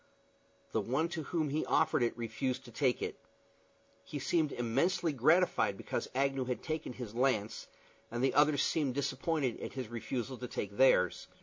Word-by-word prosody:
The - - +1
one 155 +7 0
to 170 -2 -3
whom 155 -2 -1
he 150 +3 0
offered 160 -4 +3
it 120 0 0
refused 130 +3 -2
to 120 - -11
take 125 +1 +1
it. - - -4 0.9
He 150 - -6
seemed 155 +2 +1
immensely 140 +8 +1
gratified 135 - +3
because - - -3
Agnew 135 -1 +1
had 125 -1 -3
taken 155 -4 -3
his 120 -4 -7
lance, 120 -4 0 0.4
and 120 +2 -2
the 135 - +3
others 145 -1 +4
seemed 140 -5 0
disappointed 140 -1 -1
at - - -5
his 130 -4 -5
refusal 120 +2 -4
to 125 - -5
take 100 -3 -4
theirs. 90 -9 +4
130 Hz, 170 wpm, -33 LUFS, 120-150 Hz, 0.9 s, others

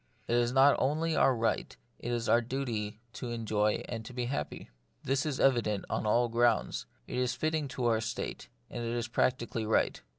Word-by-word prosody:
It - - 0
is 120 0 +2
not 135 +2 +6
only 155 +4 +1
our 130 - +4
right, 115 - -1 0.2
it 120 - -4
is 120 -1 -1
our 120 - +5
duty 115 -4 -3
to 125 - -5
enjoy 110 -2 0
and 115 -2 -5
to 125 - -9
be 125 -1 -2
happy. 120 - -4 0.3
This 135 +3 0
is 140 -3 -2
evident 115 -7 +2
on - - -1
all 120 +3 +3
grounds. 115 - +1 0.2
It - - -3
is 125 0 0
fitting 155 +1 -1
to 130 -1 -3
our 115 -2 +3
state, 110 - -4 0.2
and 120 - -5
it 115 0 -2
is 120 -1 -2
practically 120 -1 0
right. 110 0 +1
120 Hz, 195 wpm, -31 LUFS, 115-130 Hz, 0.3 s, not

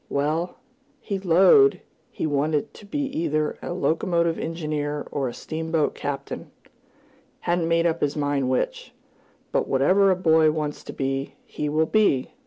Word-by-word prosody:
Well, 155 +5 -1 0.4
he 200 -5 -4
"'lowed" 190 - +5 0.3
he - - -4
wanted 150 0 0
to 205 - -14
be 290 +7 -2 0.2
either 155 -2 -1
a - - -5
locomotive 170 -1 0
engineer 150 -3 -3
or 140 -2 -1
a 120 - -5
steamboat 160 -1 -1
captain 140 -1 -5 0.9
hadn't 175 -1 0
made 165 0 +2
up 170 0 0
his 145 0 0
mind 145 -3 0
which. 130 - -2 0.6
"But - - 0
whatever 185 +9 +4
a 190 - +4
boy 160 -3 +4
wants 150 -1 -3
to - - -6
be, 135 0 -3
he 150 - -4
will 155 +2 +2
be!" 180 - +2
160 Hz, 150 wpm, -24 LUFS, 145-170 Hz, 0.9 s, lowed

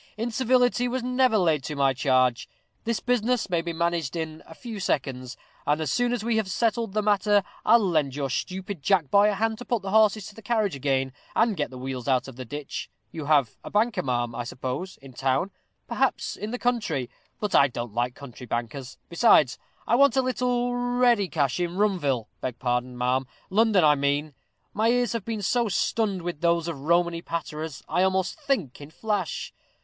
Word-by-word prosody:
Incivility 245 +2 +2
was 250 0 -2
never 250 -2 +3
laid 160 -7 +2
to 150 - -4
my 135 -1 +3
charge. 130 -2 +2 0.4
This 230 -1 0
business 245 -3 0
may 170 -1 +2
be 170 0 -4
managed 170 -2 -1
in 160 -1 -4
a 160 - -12
few 230 -4 -7
seconds; 130 -8 -2 0.3
and 150 +1 +2
as 155 -4 -1
soon 245 0 +1
as 245 -3 -2
we 230 -1 +1
have 215 -3 0
settled 230 0 0
the 215 0 0
matter, 205 -1 +3 0.2
I'll 225 -2 +5
lend 150 -6 +1
your 140 -2 -2
stupid 185 +3 -4
jack 170 -5 +2
boy 205 +1 +6
a 210 - 0
hand 220 +2 -1
to 245 - -8
put 235 -5 -1
the 195 - -4
horses 215 -1 +4
to 210 - -10
the 225 - -12
carriage 215 -6 0
again, 135 -1 0 0.2
and 225 -2 +3
get 150 -4 -2
the 130 - -10
wheels 130 -1 -5
out 130 -1 +2
of 135 - -10
the 130 0 -7
ditch. 145 +4 -6 0.2
You 160 -3 -6
have 140 -6 +2
a - - -7
banker, 210 -2 +1
ma'am, 120 -2 -1
I 120 - -3
suppose, 130 +9 -5
in 135 -1 -12
town 135 +9 0 0.4
perhaps - - 0
in 210 - -5
the 245 - -3
country; 215 - -1 0.3
but 210 -2 -2
I 140 - +6
don't 120 -3 -6
like 120 +2 -1
country 125 -3 -11
bankers; 120 +3 -4
besides, 170 - +4 0.3
I - - 0
want 280 -2 +5
a 265 - +4
little 245 -1 0
ready 245 -4 +2
cash 145 -3 0
in 175 0 -2
Rumville 165 - +1 0.2
beg 125 -2 -3
pardon, 125 0 -1
ma'am, 125 +1 0 0.2
London 210 -2 +4
I 150 -1 +6
mean. 145 +1 0 0.4
My 220 +2 +2
ears 245 -2 +2
have 230 -4 -3
been 220 -3 -3
so 235 +3 +1
stunned 200 -1 0
with 175 -3 -4
those 170 -1 +2
Romany 170 +2 +1
patterers, 160 -3 -5
I 180 - +1
almost 190 - +1
think 225 - -1
in 145 - -9
flash. 205 0 -3
175 Hz, 195 wpm, -26 LUFS, 135-220 Hz, 0.4 s, boy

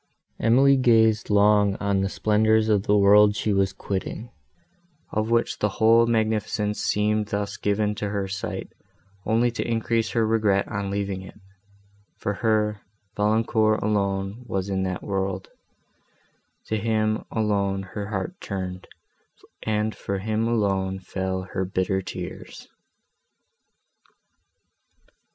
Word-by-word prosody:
Emily 135 +4 +5
gazed 115 -3 +3
long 105 -1 +4
on 100 -1 0
the 95 - 0
splendours 110 +1 +2
of 105 -2 +1
the 105 - +4
world 105 +1 +6
she 105 0 0
was 95 -1 +2
quitting, 100 +4 -5 0.8
of 110 +1 -1
which 115 0 +1
the 105 - +1
whole 115 +1 +5
magnificence 110 -2 0
seemed 105 0 +1
thus 100 0 -3
given 105 +1 0
to 105 - -1
her 100 -1 -2
sight 100 +1 -5 0.5
only 120 +2 +2
to 120 - -3
increase 115 0 0
her 115 -2 +2
regret 105 -3 +2
on 100 -1 -3
leaving 100 -1 -3
it; 95 - -13 0.8
for 105 - -2
her, 105 -1 +1 0.3
Valancourt 110 +1 +2
alone 100 +1 -1
was 95 -2 -2
in 95 -1 -1
that 95 -1 -3
world; 95 -1 -3 1.2
to 110 - -1
him 110 0 0
alone 100 -3 0
her 100 +2 -6
heart 105 - -3
turned, 95 -2 -5 0.7
and 110 0 -1
for 100 - -4
him 110 +3 -1
alone 95 -4 0
fell 95 0 -3
her 95 0 -3
bitter 95 +1 -1
tears. - - -8
105 Hz, 125 wpm, -24 LUFS, 95-110 Hz, 1.2 s, world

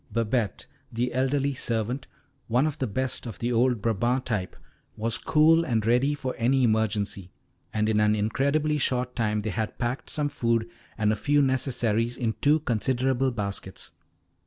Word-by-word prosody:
Babette, 115 -2 -1 0.3
the 120 +2 -1
elderly 135 +2 +1
servant, 120 +1 -2 0.4
one 125 +5 +2
of 155 0 -3
the 130 - 0
best 130 +4 -2
of 110 -6 -7
the 120 +1 -2
old 120 -2 +2
Brabant 120 +4 +1
type, 100 -6 -2 0.4
was 115 +1 -1
cool 160 +2 +4
and 115 -8 0
ready 125 +5 +3
for 130 -3 -4
any 130 +3 +3
emergency, 105 -4 0 0.4
and 110 0 0
in 110 -1 +2
an 105 0 +3
incredibly 140 +8 +1
short 125 -2 -1
time 105 -3 0
they 110 +1 -3
had 110 -1 -3
packed 125 +2 -3
some 150 -1 0
food 115 -5 0 0.3
and 110 -1 +2
a - - -1
few 145 +7 +2
necessaries 120 -3 +1
in 115 -3 -1
two 150 +2 +4
considerable 130 +1 +1
baskets. 100 -4 -5
120 Hz, 160 wpm, -26 LUFS, 110-130 Hz, 0.4 s, cool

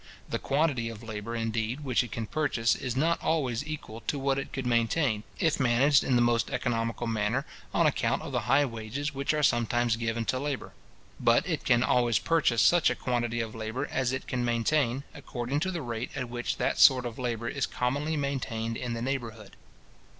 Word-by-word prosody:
The - - -2
quantity 135 -5 0
of 115 0 -9
labour, 110 +1 -5
indeed, 115 +3 -2
which 130 -3 +1
it 120 - -9
can 115 - -3
purchase, 115 -4 +1
is 130 -2 -4
not 165 +5 +1
always 135 -7 0
equal 115 -7 -6
to 145 - 0
what 135 0 0
it 135 - -6
could 135 -2 -4
maintain, 115 0 +1 0.2
if 160 -3 +1
managed 135 +3 +4
in 130 - +1
the 120 - +4
most 120 -1 +2
economical 115 -1 -1
manner, 115 +4 0 0.3
on - - +3
account - - +1
of - - -6
the - - +1
high 140 +2 +5
wages 120 +5 -4
which 140 0 0
are 155 -1 0
sometimes 120 -2 +2
given 115 0 -2
to 130 - 0
labour; 140 -1 -4 0.5
but - - +3
it - - -2
can 120 0 +4
always 120 -3 +3
purchase 130 -9 +2
such 170 +8 +5
a - - -1
quantity 120 -2 -1
of 110 -1 -5
labour 110 +3 -3
as 130 -2 0
it 130 0 -3
can 125 -1 -2
maintain, 120 +2 +1
according 135 -2 -3
to 185 +4 -1
the 175 -5 -3
rate 120 0 -4
at 130 -4 -3
which 120 0 -3
that - - 0
sort 130 -2 +7
of 120 0 -6
labour 120 -2 -2
is 135 +2 -1
commonly 145 +5 -1
maintained 125 -5 -2
in 120 -2 -3
the 115 0 -3
neighbourhood. 115 -6 -4
120 Hz, 200 wpm, -28 LUFS, 115-140 Hz, 0.5 s, sort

